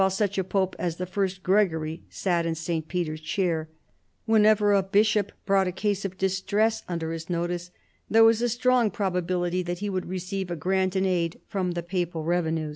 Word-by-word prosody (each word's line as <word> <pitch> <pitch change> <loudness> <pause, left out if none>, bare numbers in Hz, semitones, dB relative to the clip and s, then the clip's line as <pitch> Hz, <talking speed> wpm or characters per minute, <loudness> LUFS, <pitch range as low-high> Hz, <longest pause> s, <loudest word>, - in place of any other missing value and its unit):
$ft 190 0 +3
such 200 -1 0
a - - +1
pope 190 0 0
as 170 -2 -1
the 180 - -4
first 190 0 -2
Gregory 165 -5 +1
sat 175 -3 0
in 165 -1 -1
St. 160 -1 -3
Peter 170 -3 -2
st 155 - -17
chair, 165 -5 0 0.6
whenever 215 -2 +4
a 200 - +4
bishop 205 +1 +2
brought 195 -1 +3
a - - -1
case 200 +2 -1
of 190 -1 -5
distress 200 +4 +1
under 165 -2 -2
his 165 +1 -6
notice 175 0 -2 0.4
there 225 +1 +6
was 225 0 +5
a 240 - +2
strong 245 -1 +3
probability 180 -2 -1
that 175 0 -3
he 205 +2 -3
would 185 -1 -3
receive 185 +1 -4
a 175 - -2
grant 185 +3 0
in 190 0 +2
aid 170 -3 0
from 185 -3 -2
the 170 0 -3
papal 175 -2 -2
rev 175 +1 +1
enues. 160 -1 -2
185 Hz, 200 wpm, -26 LUFS, 175-200 Hz, 0.6 s, there